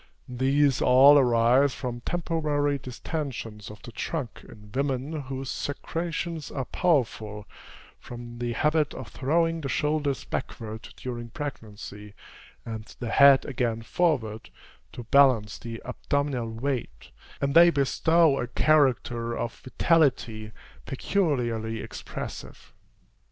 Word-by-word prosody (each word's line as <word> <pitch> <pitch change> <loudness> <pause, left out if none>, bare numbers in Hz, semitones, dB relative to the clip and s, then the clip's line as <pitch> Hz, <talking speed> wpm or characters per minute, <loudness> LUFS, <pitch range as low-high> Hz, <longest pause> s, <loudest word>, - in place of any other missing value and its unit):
These 135 +2 +2
all 135 +3 +7
arise 125 +2 +4
from 120 -2 -5
temporary 150 -3 -1
distensions 120 -4 -6
of 105 0 -12
the 120 - -9
trunk 130 +1 -5
in 105 -1 -14
women 140 +3 -2
whose 135 0 -5
secretions 165 +2 -4
are 135 -2 -4
powerful, 110 - 0 0.5
from 120 0 -9
the 120 -1 -2
habit 150 +3 +1
of 130 -5 -8
throwing 165 - 0
the 135 - -4
shoulders 150 -2 0
backward 110 -3 -5
during 120 -2 -6
pregnancy, 105 -6 -8 0.5
and 110 -1 -6
the 120 - -4
head 140 -1 +7
again 120 -4 -2
forward, 115 -8 -1 0.4
to 120 - -7
balance 115 -4 +4
the 115 -1 -7
abdominal 140 -5 -2
weight; 115 - -4 0.3
and 140 0 0
they 170 +2 +8
bestow 160 +1 +3
a 120 - -2
character 120 -4 +2
of 115 - -3
vitality 125 -7 +1 0.4
peculiarly 120 - -1
expressive. - - -8
130 Hz, 115 wpm, -26 LUFS, 115-145 Hz, 0.5 s, they